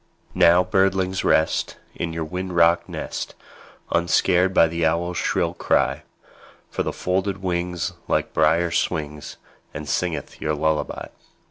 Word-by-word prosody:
Now, 85 +2 +5
birdlings, 95 0 +1
rest, 80 - +1 0.2
In 85 - -4
your 80 0 -3
wind 90 +2 -5
rocked 85 0 +4
nest, - - -5 0.6
Unscared 90 +2 +3
by 85 - +5
the 85 +1 -3
owl's 85 +2 0
shrill - - 0
cry; - - +1 0.7
For - - -2
with - - -3
folded 95 +1 -1
wings 90 0 -2
Little - - +1
Brier 80 +2 +3
swings, 75 -3 -2 0.4
And 75 - -6
singeth 85 +2 -3
your 75 0 0
lullaby. 80 +1 -1
85 Hz, 130 wpm, -23 LUFS, 80-90 Hz, 0.7 s, Now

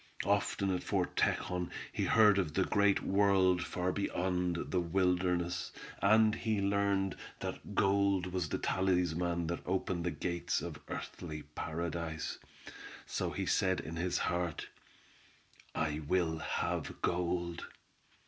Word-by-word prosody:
Often 100 -1 +1
at 90 - -1
Fort - - -1
Tejon 90 -1 0 0.2
he - - 0
heard 105 -3 +6
of 80 -6 -1
the 95 - +3
great 100 0 +3
world 95 -2 +4
far 90 0 -1
beyond 90 -2 -1
the 90 - +2
wilderness, 90 -1 +1 0.3
and 110 +1 +5
he 110 -3 0
learned 100 -1 +1 0.3
that - - -5
gold 100 -2 +2
was 90 -5 -1
the - - -1
talisman 90 -2 +1
that 85 +1 -3
opened 90 -2 -1
the 90 - +1
gates 85 +2 -1
of - - -6
earthly 75 -3 -6
paradise. 80 +1 -4 0.7
So - - -2
he - - -3
said 95 -1 +2
in 80 - -6
his 90 +1 0
heart, 90 -3 -1 1.1
"I 75 -1 0
will 80 +1 0
have - - -2
gold!" 85 -1 -1
90 Hz, 130 wpm, -33 LUFS, 85-95 Hz, 1.1 s, heard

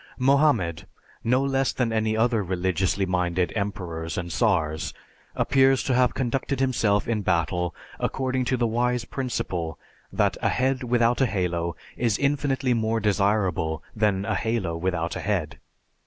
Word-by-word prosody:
Mohammed, 130 - +2 0.4
no 125 +3 +2
less 135 -1 +1
than 125 -3 0
many 110 -1 0
other 115 -1 +2
religiously 95 +1 0
minded 90 -1 0
emperors 90 -6 -3
and 85 -2 -3
tsars, 80 -9 0 0.4
appears 135 -1 +3
to 130 - 0
have 125 -1 +3
conducted 130 +1 -1
himself 115 -6 +1
in 115 -2 0
battle 90 -1 0 0.2
according 130 -1 -1
to 130 +1 +1
the 120 - +1
wise 120 +1 0
principle 90 - -3 0.3
that - - +1
a - - +2
head 130 +1 +1
without 120 0 +2
a 135 - +4
halo 85 -4 -1 0.2
is 115 -4 +1
infinitely 135 -2 +1
more 115 -1 0
desirable 100 -6 +1
than 105 -3 +1
a - - 0
halo 110 -7 -1
without 85 -1 -2
a - - -4
head. 80 -10 -2
110 Hz, 145 wpm, -25 LUFS, 90-125 Hz, 0.4 s, a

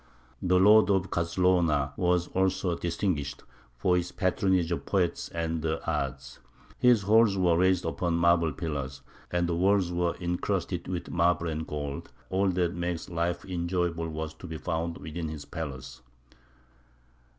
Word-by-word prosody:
The 90 0 +3
lord 105 +3 +6
of 95 -2 +1
Cazlona 85 -5 +2
was 90 +1 +1
also 95 -1 0
distinguished 85 -4 -2 0.3
for 90 +8 +2
his 90 0 -1
patronage 95 -2 +1
of 85 - -2
poets 90 -4 0
and 80 -1 -2
the 80 0 -1
arts; 65 -1 -3 0.4
his 120 -5 +5
halls 105 0 +4
were 90 -3 +3
raised 90 +1 +2
upon 85 +1 -1
marble 85 -1 +3
pillars, 70 -4 -5 0.3
and 85 0 0
the 85 - 0
walls 95 0 +2
were 85 -1 0
encrusted 90 0 -2
with 90 -2 -4
marble 85 0 +2
and 80 0 -4
gold; 70 -2 -5 0.2
all 95 +1 +2
that 90 -1 0
makes 85 0 -3
life 85 +1 -1
enjoyable 85 -2 -1
was 80 0 -4
to 85 +3 -11
be 80 -1 -5
found 85 0 -3
within 80 +3 -5
his 75 -2 -7
palace. 70 -5 -7
85 Hz, 150 wpm, -28 LUFS, 80-90 Hz, 0.4 s, lord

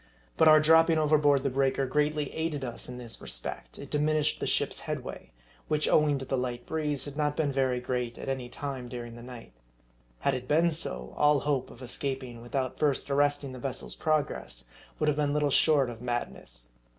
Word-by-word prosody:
But 160 - +5
our 155 0 +9
dropping 160 +1 +5
overboard 145 -3 +4
the 140 - 0
breaker 135 +1 +1
greatly 150 +2 0
aided 160 -3 -2
us 120 0 -6
in 125 - -6
this 120 -2 -8
respect: - - -5
it 140 - -9
diminished 150 0 +1
the - - -2
ship's - - 0
headway; - - -5 0.4
which 150 0 +1
owing 150 -2 +4
to 135 - -6
the 130 0 -1
light 120 -1 -3
breeze 150 -3 -1
had 145 -1 -7
not 150 -1 0
been 150 -3 +1
very 130 -2 +1
great 125 -1 -2
at - - -7
any 130 -2 -3
time 130 -2 -5
during 120 -1 -6
the 120 - -10
night. 120 - -10 0.7
Had 140 - +2
it 125 -1 -4
been 160 +3 +4
S0j 110 - -2
all 150 -2 +4
hope 140 -3 0
of 120 - -13
escap 130 +2 -3
ing 120 -2 -9
without 130 +1 -3
first 145 -1 +1
arresting 145 -1 +2
the 130 - -8
vessel's 130 0 -4
progress, 145 - -1 0.3
would 155 - 0
have 150 -1 +2
been 145 -1 +1
little 150 -1 +2
short 145 -2 +4
of 120 -1 -7
madness. 90 - -4
140 Hz, 200 wpm, -29 LUFS, 125-150 Hz, 0.7 s, our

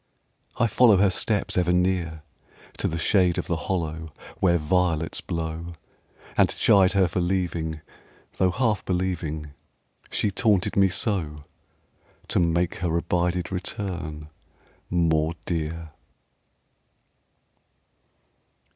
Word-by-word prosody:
I 120 - +3
follow 110 -1 +5
Her 95 0 +4
steps, 100 0 0
ever 90 0 +2
near, 90 -3 0 0.6
To - - +1
the 80 - -3
shade 90 +1 +2
of - - -2
the 85 - -1
hollow 80 -3 -2 0.3
Where 85 -2 +3
violets 85 -1 0
blow: 85 +1 -4 0.6
And - - +4
chide 95 -2 +4
her 95 -2 +4
for 90 +1 -2
leaving, 85 -3 -2 0.6
Tho' 95 - +3
half 110 0 0
believing 85 -5 -2 0.6
She 105 - 0
taunted 100 -2 +1
me 95 -1 +4
so, 90 -7 -1 0.9
To - - +2
make 85 0 +1
her 85 -1 0
abided 90 +1 -1
return 90 -5 -5 0.6
more 80 -2 +1
dear. 80 -1 -3
90 Hz, 110 wpm, -25 LUFS, 80-95 Hz, 0.9 s, follow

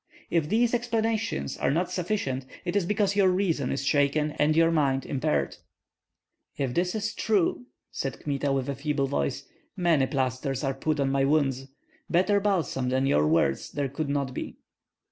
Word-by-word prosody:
If 165 -3 +1
these 235 +2 +2
explanations 225 -2 -1
are - - +1
not 170 +5 0
sufficient, 165 -9 -2 0.2
it 175 - -2
is 195 -4 +1
because 205 -1 +1
your 200 -2 +4
reason 180 -8 0
is 135 0 -2
shaken 145 +1 +2
and 150 +1 +3
your 165 0 +4
mind 135 -4 +1
impaired." 75 - -1 1.0
"If 135 -3 -1
that 180 - 0
is 215 +1 -2
true," 185 - 0 0.2
said 135 - -4
Kmita, 140 -1 -1
with 135 -2 0
a 140 - -1
feeble 140 0 -1
voice, 70 - -2 0.3
"many 165 -7 +3
plasters 130 +1 -1
are 135 -1 0
put 150 +3 -1
on 135 -1 +1
my 135 0 +2
wounds; 135 -2 +1 0.4
better 185 +4 +3
balsam 175 -10 0
than 130 +1 +1
your 75 - +3
words 75 -4 +1
there 140 -2 -1
could 140 +2 -3
not 140 -2 -1
be." - - -6
145 Hz, 170 wpm, -27 LUFS, 135-180 Hz, 1.0 s, your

